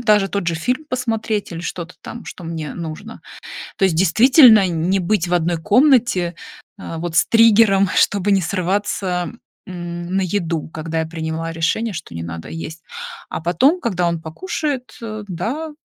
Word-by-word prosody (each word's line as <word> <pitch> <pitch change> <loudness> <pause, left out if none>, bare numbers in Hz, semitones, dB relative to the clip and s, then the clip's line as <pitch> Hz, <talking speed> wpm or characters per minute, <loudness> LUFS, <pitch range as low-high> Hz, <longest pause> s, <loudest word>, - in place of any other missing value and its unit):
даже 210 -4 +3
тот 200 -2 -3
же 170 - +1
фильм 250 - -1
посмотреть 225 -5 -2
или 165 - -5
что-то 175 0 -6
там, 235 - -9
что 180 - -9
мне 165 -2 -5
нужно. 160 -2 -7 0.6
То 195 - +1
есть, 180 -4 +2
действительно, 225 - +7
н 165 -1 -1
не 195 +1 +2
быть 180 0 +1
в 175 - +1
одной 175 0 +1
комнате, 215 - +3 0.4
а, 165 -4 -6
вот 165 0 -4
с 185 - +5
триггером, 220 -4 +5
чтобы 200 0 +2
не 195 - +4
срываться, 185 0 -1 0.3
м, 175 0 -5
на - - +3
еду, 170 -4 -2
когда 160 0 -3
я 160 - -2
приняла 160 0 -4
решение, 170 +8 -1
что 160 - -7
не 85 - -5
надо 85 0 -7
есть. 165 0 -7 0.5
А - - -3
потом, 180 - +2
когда 180 - 0
он 170 -1 -2
покушает, 275 - -4
э, 215 -2 -6
да, 235 - -3
180 Hz, 170 wpm, -20 LUFS, 165-220 Hz, 0.6 s, действительно